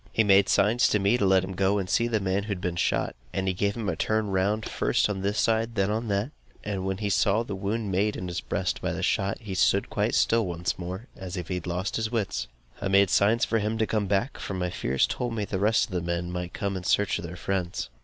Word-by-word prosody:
He 110 - +3
made 100 -1 +5
signs 110 +5 +4
to - - +2
me 100 +3 +3
to 100 - +3
let 95 -1 +4
him 95 - -5
go 95 +2 +2
and 95 -2 -2
see 115 +5 +2
the 110 -2 +1
man 95 0 0
who 100 - -8
had 100 -4 -2
been 90 -2 -2
shot; - - 0 0.2
and 95 0 -1
he 95 - +2
gave 100 +3 -1
him 110 -3 -3
a 90 - 0
turn 110 +3 0
round, 100 +3 +1
first - - +1
on 95 -2 -4
this 100 +2 -1
side, 115 +1 +1
then 100 0 +1
on 115 +2 -2
that; 100 +6 -1 0.3
and 100 -2 -3
when 95 0 -2
he 105 0 -2
saw 105 +3 +3
the 105 - -6
wound 100 +2 -2
made 100 +3 +1
in 90 - -5
his 90 +1 -3
breast 95 -2 -2
by - - -1
the - - -4
shot, 100 0 +1
he 105 -4 -6
stood 100 +1 +2
quite, 105 +3 0
still 115 -3 +3
once 85 +1 -3
more, 95 +5 -5
as 95 -1 -7
if 90 -2 -5
he - - -1
had 90 -1 -4
lost 90 +2 -2
his 110 0 -2
wits. 95 - -1 0.3
I 100 - -1
made 100 -1 +4
signs 110 +4 +4
for 115 - +1
him 110 +2 -1
to 110 - +2
come 105 -2 -1
back, 100 +7 0
for 100 - -4
my 90 -1 -2
fears 65 -4 +1
told 120 -2 -3
me 105 - -1
that - - -19
the 95 - 0
rest 110 +3 +3
of - - -16
the 90 -1 -1
men 85 +1 -2
might 90 0 -4
come 100 -1 -3
in 95 - -5
search 100 +1 +2
of - - -6
their 85 +1 -7
friends. 90 -3 -3
100 Hz, 275 wpm, -27 LUFS, 95-105 Hz, 0.3 s, made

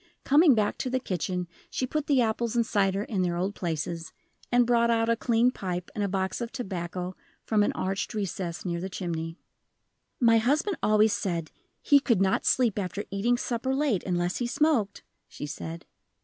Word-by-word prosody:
Coming 290 -1 +6
back 210 -2 0
to 255 - -2
the 260 +1 0
kitchen, 180 -3 -3 0.2
she 255 - -1
put 300 +3 -2
the 270 -4 +4
apples 230 +1 -1
and 235 -1 +3
cider 200 -2 +1
in 205 -3 -2
their 175 -1 0
old 190 +3 -1
places, 165 -2 -3 0.4
and 245 0 +5
brought 235 -1 +3
out 230 0 +2
a 230 - +4
clean 235 +1 +2
pipe 180 -6 -4
and 210 - -2
a - - +1
box 190 +3 -2
of 235 0 -4
tobacco 180 -6 -4 0.3
from 215 -2 +2
an 205 - +2
arched 195 +4 -2
recess 185 -4 -3
near 170 -1 -2
the 190 - -4
chimney. 165 -3 -4 0.8
"My 230 -2 +5
husband 305 - +1
always 215 0 +4
said 170 -4 -2 0.3
he 285 - +6
could 235 -7 +2
not 190 0 +1
sleep 235 -5 +3
after 200 +1 -3
eating 225 +5 +1
supper 250 +2 -1
late 270 -9 +1
unless 175 -1 -1
he 245 - -1
smoked," 240 -7 +1 0.2
she - - -7
said. 160 +2 -7
205 Hz, 185 wpm, -27 LUFS, 180-240 Hz, 0.8 s, Coming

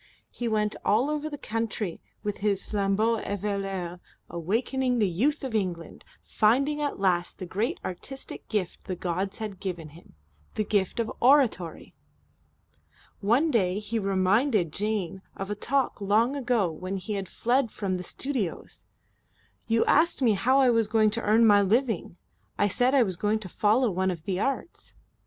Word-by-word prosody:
He 240 - -4
went 215 -1 0
all 245 +8 +2
over 300 0 -2
the 290 - -6
country 220 -7 -3 0.2
with 205 -1 -2
his 200 -2 0
flambeau 210 +3 +1
eveilleur, 195 -3 -3 0.3
awakening 245 +9 0
the 210 -3 +3
Youth 240 - 0
of 260 -4 -4
England, 180 -6 -3 0.2
finding 275 +8 +2
at 290 -7 -2
last 180 -3 +1
the 185 - -6
great 205 +7 -2
artistic 270 +9 -6
gift 200 -5 -3
the 185 - -3
gods 185 +3 -3
had 210 -4 -6
given 175 -5 -5
him, 160 - -17 0.4
the 215 - +1
gift 200 0 0
of 230 - -1
oratory. 245 - +2 1.3
One 245 +10 +2
day 190 -6 +2
he 210 +2 -2
reminded 195 - +2
Jane 200 -3 -2 0.2
of 195 +1 -4
a - - -1
talk 265 +2 -1
long 220 +7 +2
ago 240 -9 +1
when 185 +5 -5
he 210 +3 -5
had 195 -3 -4
fled 245 +1 +1
from 195 -3 -2
the 180 - -6
studios: 245 -3 -4 0.8
"You 225 0 +2
asked 330 +3 +4
me 230 -3 +5
how 245 +7 +2
I 255 -2 +5
was 230 -2 +2
going 215 -1 +3
to 230 +2 -2
earn 220 +2 +4
my 205 -2 +6
living. 215 -3 0 0.4
I 205 - +3
said 250 +7 +2
I 265 - +6
was 185 -5 -3
going 210 +3 +1
to 215 -3 -8
follow 220 +5 +2
one 190 +1 0
of 170 -4 -4
the 185 0 -2
Arts." 275 - -3
210 Hz, 165 wpm, -27 LUFS, 190-240 Hz, 1.3 s, my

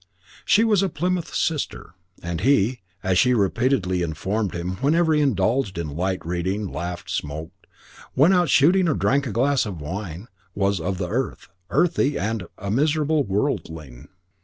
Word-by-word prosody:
She 220 - +4
was 210 -4 +3
a 195 - +1
Plymouth 175 +2 -2
Sister, 150 - -2 0.3
and 85 -1 -3
he, 120 -1 +2 0.2
as 95 -1 +2
she 125 -1 +4
repeatedly 100 -3 +1
informed 95 +6 -2
him 90 +2 -3
whenever 160 - +2
he 150 - +3
indulged 115 -4 +1
in 75 -4 -4
light 95 +1 -2
reading, 95 +3 -2
laughed, 90 +1 -5
smoked, 80 +2 -5 0.5
went 155 +8 +5
out 175 -4 +3
shooting, 175 +8 +4
or 145 - +1
drank 140 +1 +1
a - - -3
glass 130 +5 +2
of 100 -6 -5
wine, 90 +5 -6 0.3
was 100 -1 +1
of 95 +3 -2
the 90 -1 -2
earth, 120 +4 -3 0.2
earthy, 160 -5 +2
and 110 -2 -2
a 100 0 -4
miserable 150 +4 +2
worldling. 80 - -3
105 Hz, 160 wpm, -23 LUFS, 90-145 Hz, 0.5 s, went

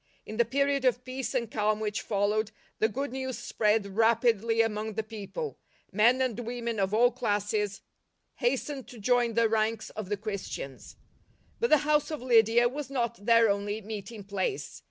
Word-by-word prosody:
In 215 - -7
the 235 - +4
period 280 +3 +1
of 250 -1 +2
peace 260 +1 -4
and 235 -3 -1
calm 215 0 +1
which 210 -1 -2
fol 205 -1 0
lowed, 215 0 0 0.3
the 220 - +4
good 275 +4 -3
news 260 -1 -4
spread 215 -1 +1
rapidly 225 +2 +2
among 215 0 -2
the 220 - -1
people; 220 - -6 0.3
men 235 +6 +4
and 245 -3 -2
women 235 -1 -3
of 190 0 +1
all 240 +3 +4
classes 210 -4 -1 0.6
hastened 265 +2 -1
to 245 - -11
join 240 +1 +2
the 230 -1 +4
ranks 220 0 0
of 215 -3 -6
the 205 - -1
Christians. 200 - -6 0.6
But 470 - +1
the 305 - +7
house 300 -1 +2
of 310 -2 -4
Lydia 235 -1 +4
was 275 +3 -5
not 235 -5 -3
their 230 -1 +6
only 205 +1 -1
meeting 210 0 -7
place. 205 - -3
225 Hz, 175 wpm, -29 LUFS, 210-250 Hz, 0.6 s, the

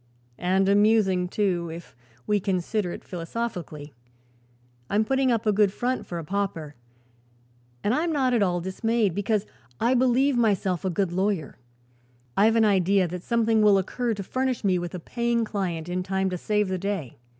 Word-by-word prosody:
And 190 +2 +2
amusing, 200 -3 +3
too, 180 -3 -1
if 165 -6 -10 0.3
we 210 -1 +2
consider 190 0 -1
it - - -8
philosophically. 170 -5 -5 1.0
I'm 210 +2 +2
putting 265 +1 +2
up 230 -1 0
a 215 - +4
good 205 -1 +3
front, 250 +5 -2
for 175 - -5
a 165 - -5
pauper, 165 -4 -3 1.1
and 210 - +2
I'm 325 +5 0
not 265 -4 +1
at 235 - +2
all 175 -3 +1
dismayed, 210 +2 0
because 205 +2 0 0.3
I 240 +2 +2
believe 260 +2 +3
myself 200 -6 +1
a 190 - 0
good 185 0 -1
lawyer. 185 -6 -1 0.8
I've 220 +3 +4
an 225 -1 +4
idea 195 -2 +3
that 180 +1 -5
something 225 0 +2
will 205 -2 +6
occur 230 +5 -1
to 200 - -5
furnish 255 +4 -2
me 185 -3 +2
with 175 0 -5
a - - -4
paying 235 +5 -1
client 180 -6 -3
in 180 +1 -2
time 190 0 -1
to 180 - -2
save 210 +1 0
the 185 -1 -2
day. 195 - -4
200 Hz, 170 wpm, -25 LUFS, 180-225 Hz, 1.1 s, will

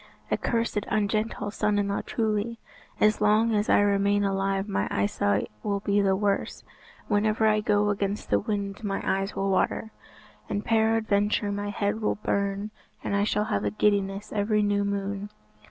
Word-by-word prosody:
"A - - +4
cursed 230 -3 -1
ungentle 215 0 -1
son 210 -1 0
in 200 -1 0
law, 200 - -1
truly. 220 0 -1 0.4
As 215 0 +3
long 215 +2 +3
as 210 0 +1
I - - +5
remain 200 0 +2
alive 195 0 0
my 195 - -1
eyesight 100 0 0
will 200 -1 -1
be 205 0 +2
the 195 -1 +3
worse. 200 0 -1 0.4
Whenever 215 +1 +2
I 215 -1 +4
go 210 0 +2
against 200 0 -3
the - - +4
wind 200 -1 -3
my 195 -2 -2
eyes 195 +1 -1
will 195 0 0
water, 220 +3 0 0.6
and 205 - -2
peradventure 220 -2 +2
my 205 0 -3
head 205 +1 -1
will 210 - +1
burn, 200 0 -2 0.3
and 200 - -1
I 200 - +2
shall 210 0 0
have 100 - -1
a 105 - +1
giddiness 200 - 0
every 210 0 +1
new 205 0 +1
moon. 200 0 -3
205 Hz, 170 wpm, -26 LUFS, 200-210 Hz, 0.6 s, I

